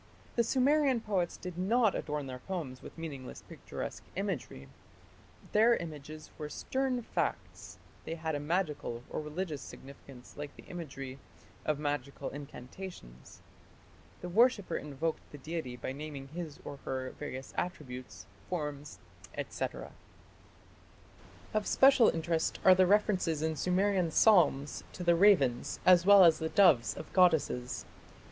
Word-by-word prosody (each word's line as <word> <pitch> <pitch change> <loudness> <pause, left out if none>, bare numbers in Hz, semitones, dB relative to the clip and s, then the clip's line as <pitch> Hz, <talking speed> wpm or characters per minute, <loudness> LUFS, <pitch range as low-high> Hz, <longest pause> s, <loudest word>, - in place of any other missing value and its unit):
The 235 - +3
Sumerian 270 +2 +3
poets 195 -6 -1
did 180 -1 -7
not 220 +3 +3
adorn 150 -1 -3
their 130 -1 -7
poems 150 -6 -5
with - - -11
meaningless 145 -6 -7
picturesque - - -7
imagery; 170 - -4 0.8
their 225 +3 +5
images 155 -3 -8
were 150 -1 -4
stern 260 - -2
facts; - - -3 0.3
they 165 - -4
had 160 -1 -3
a 145 - -1
magical 150 -7 -2
or - - -2
religious 155 0 -4
significance 135 -2 -12
like 145 -1 -7
the - - -13
imagery 135 -6 -7 0.5
of 155 -2 +1
magical 145 -1 -3
incantations; 135 - -10 0.8
the - - -5
worshipper 225 +1 +3
invoked 150 +2 -3
the 145 - -9
deity 155 -3 -5
by 125 - -4
naming 140 -1 -7
his 160 -2 -7
or 140 - -6
her 130 -1 -4
various 135 -3 -6
attributes, 125 - -5 0.2
forms, 150 -4 -4 0.5
&c. - - -2 1.9
Of 215 -1 0
special 265 -4 +6
interest 165 0 -1
are 185 - +10
the 185 0 +4
references 185 -6 +2
in 160 0 0
Sumerian 185 +2 +1
psalms 155 -7 +4
to 180 - -6
the 175 -1 +5
ravens 165 -11 +3
as 180 0 +6
well 200 -1 +9
as 165 -3 +6
the 160 - -2
doves 170 -13 +4
of - - -9
goddesses. 160 -9 +2
160 Hz, 135 wpm, -32 LUFS, 140-190 Hz, 1.9 s, are